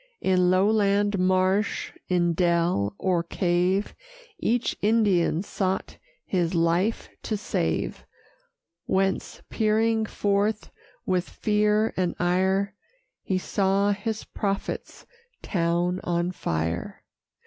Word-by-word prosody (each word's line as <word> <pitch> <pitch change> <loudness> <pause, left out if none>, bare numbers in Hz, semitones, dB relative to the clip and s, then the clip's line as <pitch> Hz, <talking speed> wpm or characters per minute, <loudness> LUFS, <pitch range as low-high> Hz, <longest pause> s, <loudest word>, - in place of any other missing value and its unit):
In 180 -1 +3
lowland 200 +1 +2
marsh, 185 +2 +1 0.2
in 175 -2 +2
dell, 170 - +1
or 180 -3 +1
cave, 180 +3 0 0.5
Each 240 +1 0
Indian 200 -6 +2
sought 190 -2 -3 0.3
his 175 -2 0
life 170 +6 +1
to 215 - -2
save; 205 - -2 0.8
Whence, 190 0 -1
peering 220 0 +1
forth, 205 +1 0 0.3
with 180 -1 0
fear 210 +1 +1
and 180 -2 0
ire, 190 +2 +1 0.5
He 190 - -1
saw 195 +2 +1
his 220 +2 -3
prophet's 200 -2 -4 0.4
town 175 0 0
on 175 +1 0
fire. 85 - -3
190 Hz, 95 wpm, -25 LUFS, 175-205 Hz, 0.8 s, In